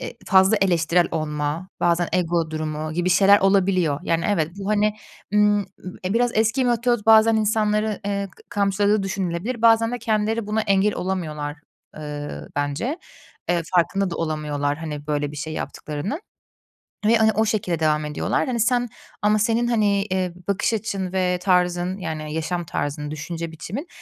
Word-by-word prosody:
eee, - - -7
fazla 190 +3 +5
eleştirel 175 -2 +2
olma, 155 +2 -3
bazen 175 0 +2
ego 170 -2 0
durumu 155 0 -3
gibi 175 +2 0
şeyler 200 +2 +6
olabiliyor. 185 -6 +2
Yani, 165 -1 0
evet, 165 -6 +1
bu, 200 0 -5
hani, 210 0 +2 0.4
ımm, 210 0 +4
ı - - -12 0.4
e, 190 - -1
biraz 240 +1 +2
eski 225 +4 +2
metot 240 -2 +1
bazen 220 0 +6
insanları, 215 -1 +1
eee, 200 -1 -2
k - - -19
kamçıladığı 200 +1 +1
düşünülebilir. 195 +5 -3
Bazen 225 0 +5
de 245 - -2
kendileri 220 0 0
buna 215 +1 0
engel 200 0 +2
olamıyorlar, 160 -5 -3 0.4
eee, 145 -1 -6 0.2
bence. 145 - -2 0.5
Eee, 175 -1 +1
farkında 185 +2 +2
da 170 - -4
olamıyorlar, 150 -3 -2
hani, 150 -2 -6
böyle, 145 -1 -1
bir 150 - -9
şey 155 +2 -5
yaptıklarının 155 - -4 0.9
ve, 230 - +5
hani, 220 -1 +4
o 220 +2 +1
şekilde 190 -6 -1
devam 155 -1 +1
ediyorlar. 150 - -1
Hani, 245 -2 -1
sen 245 +2 +2 0.3
ama 210 +1 +3
senin, 230 +3 +1
hani, 205 -4 +2
eee, 185 -3 -2
bakış 200 +3 0
açın 195 -4 -2
ve 180 -1 +1
tarzın, 180 0 +1
yani, 155 -4 -5
yaşam 170 +2 -2
tarzın, 150 -2 -3
düşünce 165 +2 -5
biçimin, 200 - -6
190 Hz, 160 wpm, -23 LUFS, 160-215 Hz, 0.9 s, şeyler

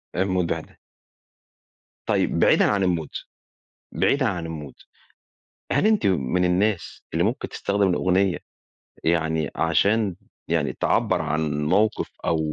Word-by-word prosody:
إيه 90 - 0
الموضوع 95 -3 0
ده! - - -16 1.3
طيب - - +1
بعيدًا - - +5
عن 100 -2 +2
الmood 80 -3 -7 0.7
بعيدًا 140 -1 +2
عن 85 -4 -3
الmood 75 -4 -9 0.9
هل 210 - +3
أنتِ 220 -1 +2
من 90 0 +1
الناس 95 +2 0
اللي 85 +1 +1
ممكن 120 +7 -1
تستخدم 100 -1 0
الأغنية، 95 +1 +2 0.7
يعني 80 -2 +1
عشان 100 +4 +2 0.3
يعني - - 0
تعبّر - - +1
عن 75 -1 -1
موقف 105 +7 +1 0.2
أو 80 - +1
90 Hz, 120 wpm, -24 LUFS, 80-100 Hz, 1.3 s, بعيدًا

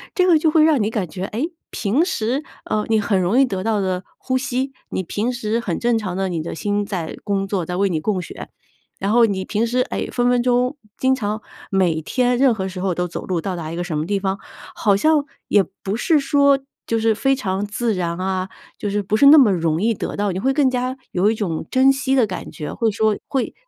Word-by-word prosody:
这 365 - +3
个 345 -3 +6
就 315 - +3
会 310 0 +5
让 310 -6 +4
你 210 - +1
感 210 -5 -2
觉， 185 +3 -5
诶， 255 - -3 0.2
平 250 - +1
时， 255 -1 -1 0.2
呃， 210 0 -1
你 220 -1 +2
很 200 -2 +1
容 185 +7 +1
易 - - +7
得 190 -6 -3
到 215 -2 +1
的 185 -1 -1
呼 260 -1 -1
吸， 260 +1 -2 0.2
你 190 - -2
平 220 +8 -2
时 230 -2 -1
很 190 -8 -2
正 240 -1 +2
常 190 -5 -3
的 190 0 -1
你 170 -3 -2
的 160 - -5
心 205 +5 -1
在 180 -6 -4
工 195 -1 0
作， 190 -4 -1
在 180 - -4
为 195 +1 +2
你 160 -3 0
供 185 +2 -1
血。 - - -9 0.5
然 200 +2 -1
后 235 0 +6
你 195 -3 -1
平 220 +3 0
时， 250 +2 0
哎， 250 - -3
分 245 0 +2
分 245 -1 +3
钟， 250 +3 +1 0.2
经 260 0 +2
常 215 -4 -2 0.3
每 180 -5 +1
天 245 - +1
任 265 -2 +4
何 190 -3 -3
时 185 0 -7
候 185 -2 -1
都 180 - -1
走 170 - -6
路， 180 -3 -1
到 185 +1 -3
达 160 -2 -5
一 - - -5
个 175 - -2
什 165 -4 -3
么 155 - -1
地 200 +2 0
方， 195 0 -2 0.3
好 200 -2 +2
像 300 +6 +3 0.2
也 205 - +5 0.2
不 200 +3 -2
是 300 +4 +3
说 280 0 +4 0.3
就 230 - +1
是 225 0 +2
非 270 +5 +1
常 200 -5 -2
自 220 +2 -1
然 170 -1 -2
啊， 185 0 -2 0.3
就 205 - -3
是 205 0 -1
不 205 +3 0
是 280 - +5
那 295 +2 +10
么 250 -7 +6
容 165 -2 0
易 230 +1 +2
得 - - -4
到。 205 -1 0
你 185 - -3
会 270 +6 +1
更 275 -1 +3
加 255 +1 -2 0.2
有 185 +4 +2
一 225 - +1
种 170 -7 -3
珍 260 +1 +5
惜 270 0 0
的 250 - +4
感 185 -5 -6
觉， 150 - -6
会 225 -2 +1
说 215 0 +1
会 265 -2 -1
210 Hz, 265 characters per minute, -21 LUFS, 190-250 Hz, 0.5 s, 那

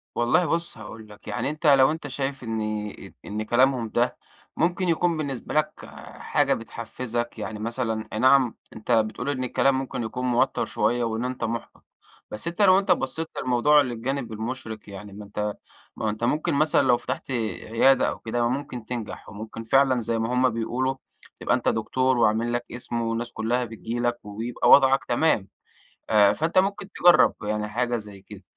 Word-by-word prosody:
والله 120 +10 +3
بُص 170 -3 -2
هاقول 110 0 -10
لك، 105 - -15
يعني 105 +5 -2
أنت 155 +2 -6
لو 135 -1 +6
أنت 160 -1 -5
شايف 135 -1 -4
إن 115 -1 -3 0.6
ت - - -20
إن 105 +1 -3
كلامهم 120 +1 +2
ده 120 +3 0 0.4
ممكن 175 +2 +1
يكون 170 0 +1
بالنسبة 140 -5 -4
لك 155 0 -1 0.3
حاجة - - +1
بتحفزك، 120 +1 -5
يعني 110 -1 -5
مثلًا 115 -1 -2
أي 110 - -2
نعم 130 -1 +4 0.2
أنت 110 +3 -5
بتقول 115 +3 +1
إن 130 -3 -2
الكلام 130 +2 +2
ممكن 130 -2 -4
يكون 125 +3 -4
موتر 120 -1 +1
شوية 120 +1 0
وإن 115 +1 -2
أنت 125 -1 -4
محبط، 115 0 -5 0.5
بس 105 +9 -5
أنت 170 +4 -2
لو 190 -1 +7
أنت 195 -1 0
بصيت 160 0 0
للموضوع 140 +4 +4
للجانب 125 0 -3
المشرق 110 0 -5
يعني 100 +1 -9
ما 105 +1 -9
أنت 100 +1 -8 0.6
ما - - -7
أهو 110 - +1
أنت 110 +2 -5
ممكن 150 +6 +1
مثلًا 155 +2 +3
لو 125 -2 +4
فتحت 135 - -5
عيادة 115 +3 +2
أو - - -6
كده 120 +1 -1
ممكن 125 -2 -4
تنجح، 120 -2 -6
وممكن 110 +2 -8
فعلًا 130 +2 +3
زي 115 0 -1
ما 115 +2 -1
هم 130 +1 +3
بيقولوا 125 +3 -1 0.4
تبقى - - +2
أنت - - -3
دكتور 130 0 +1
وعامل 115 +1 +2
لك 120 0 -2
اسم 120 0 -4
والناس 115 +1 -2
كلها 120 +3 0
بتيجي 115 +1 -5
لك 120 0 0
ويبقى 110 +4 -2
وضعك 135 -1 +6
تمام. 120 -6 +1 0.6
آآ، 105 -2 +5
فأنت 160 +4 -1
ممكن 195 0 -1
تجرب 175 -2 +5
يعني 105 0 -2
حاجة 120 +2 -1
زي 105 -3 -10
كده. 100 0 -13
120 Hz, 180 wpm, -25 LUFS, 110-135 Hz, 0.6 s, لو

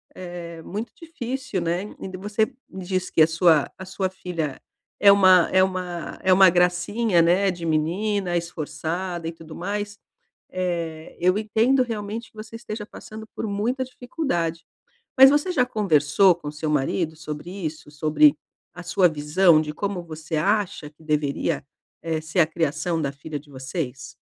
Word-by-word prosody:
eh, 175 -2 -8
muito 215 +8 -5
difícil, 265 - -4
né. 170 +2 -1 0.2
E - - -6
de 185 - -7
e - - -12
você 210 +2 +1 0.2
me 190 -1 -8
diz 185 -1 -1
que - - +2
a - - +5
sua 165 -2 +3
a 185 - -8
sua 190 0 -2
filha 170 -6 -4 0.4
é 200 - +10
uma 185 -3 +6
é 185 0 +5
uma 180 -2 -4
é 185 - +3
uma 190 +1 +8
gracinha, 180 +3 +2
né, 185 +4 +3
de 175 -2 -7
menina, 175 +4 0
esforçada 170 +1 -4
e 165 - -2
tudo 165 -1 -12
mais. 205 +3 -4 0.6
Eh, 170 -3 -3
eu 185 +3 +3
entendo 225 +5 +2
realmente 225 -1 -5
que - - -29
você 220 +1 -8
esteja 215 -2 -6
passando 220 0 -10
por - - -3
muita 225 +6 -1
dificuldade. 245 - -3 0.5
Mas 265 +1 +10
você 295 +5 +1
já 250 -7 +2
conversou 185 - +3
com 155 -3 -8
o - - -5
seu 150 +1 -3
marido 155 +3 0
sobre 155 +1 -7
isso? 160 -5 -6
Sobre 155 - +4 0.4
a 180 - -8
sua 180 +1 +3
visão 155 +2 +4
de 150 - -5
como 200 -1 -3
você 160 0 -5
acha 195 -3 0
que 155 +1 -23
deveria, 150 -1 -1 0.4
eh, 160 -1 -2
ser 160 +3 -1
a 165 - +6
criação 165 +1 -1
da 140 -2 -2
filha 145 +2 -6
de 145 +1 -20
vocês? 130 0 -5
180 Hz, 170 wpm, -24 LUFS, 160-205 Hz, 0.6 s, é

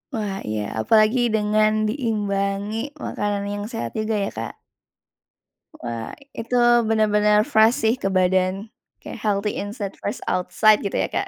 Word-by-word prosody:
Wah, 205 -3 -3
iya, 105 -1 -2 0.2
apalagi 215 - +4 0.2
dengan 215 0 +2 0.2
diimbangi 205 -3 -2 0.3
makanan 205 -1 -2
yang 205 0 -4
sehat 120 - -4
juga 215 0 -1
ya, - - -1
Kak. 115 - -4 1.3
Wah, 115 -1 -5 0.2
Itu 240 +2 -1 0.2
benar-benar 210 0 +3
fresh 225 -3 +4
sih 230 - +3
ke 195 -6 -3
badan, 185 +2 +1 0.3
kayak - - -9
healthy 210 0 0
inside, 205 -1 -5
fresh 205 - -5
outside, 205 +4 +3
gitu 200 - -2
ya, - - +1
Kak. - - -3
210 Hz, 140 wpm, -22 LUFS, 195-220 Hz, 1.3 s, apalagi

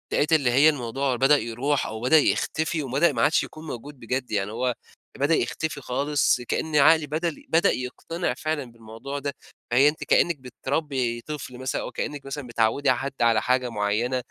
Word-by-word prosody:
لقيت 150 +3 +2
اللي 140 -6 +3
هي 140 +5 +6
الموضوع 135 -1 -1
بدأ 135 +4 +4
يروح، 135 +5 -1
أو 110 +1 -6
بدأ 130 +6 +5
يختفي، 160 +1 0
وبدأ 140 +6 +2
ما 115 - -1
عادش 155 - +3
يكون 155 +1 -10
موجود 140 +2 -8
بجد، 125 +2 -3
يعني 100 0 -1
هو 125 +1 -1 0.4
بدأ 145 +4 +3
يختفي 145 +4 -2
خالص 135 0 +1
كأن 155 +5 -3
عقلي 150 +1 +5
بدل 160 +2 -3
بدأ 165 +1 +4
يقتنع 165 +7 -3
فعلًا 150 -6 -3
بالموضوع 115 +5 -7
ده. 140 0 -3 0.4
فهي 135 +4 +6
أنتِ 155 - -5
كإنِّك 170 -2 +3
بتربّي 130 -1 -2
طفل 140 -4 -7
مثلًا 130 +1 -3
أو - - -6
كإنِّك 145 -2 -5
مثلًا 135 -1 -6
بتعوّدي 120 +4 +1
حد 135 +2 -2
على 115 -2 +4
حاجة 125 0 +1
معينة، 115 +4 0
135 Hz, 175 wpm, -25 LUFS, 120-150 Hz, 0.4 s, هي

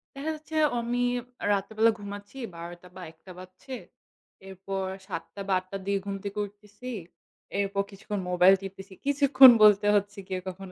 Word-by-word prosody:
দেখা 300 +3 -3
যাচ্ছে 310 +1 -10 0.2
আমি 240 +1 -1 0.5
রাতের 200 +2 -1
বেলা 225 +1 +5
ঘুমাচ্ছি 205 +4 -9 0.2
১২ঃ০০ 170 +1 -7
টা 180 - -14
বা 185 - -9
১ঃ০০ 160 - -30
টা 185 - -10
বাজছে। 185 +8 -10 0.7
এরপর 195 0 -5 0.2
৭ঃ০০ 165 -4 -4
টা 200 - -6
বা 195 - +1
৮ঃ০০ 185 - -17
টার 195 -1 -5
দিকে 200 0 0
ঘুম 200 0 -3
থেকে 200 +1 -5
উঠতেছি। 210 +5 -11 0.7
এরপর 200 0 0
কিছুক্ষণ 200 +1 -5
মোবাইল 180 +2 +6
টিপতেছি। 195 0 -9
কিছুক্ষণ 280 -2 +8
বলতে 205 0 +6
হচ্ছে 205 0 0
গিয়ে 185 -1 -3
কখনো 185 0 -7
200 Hz, 175 wpm, -27 LUFS, 190-220 Hz, 0.7 s, কিছুক্ষণ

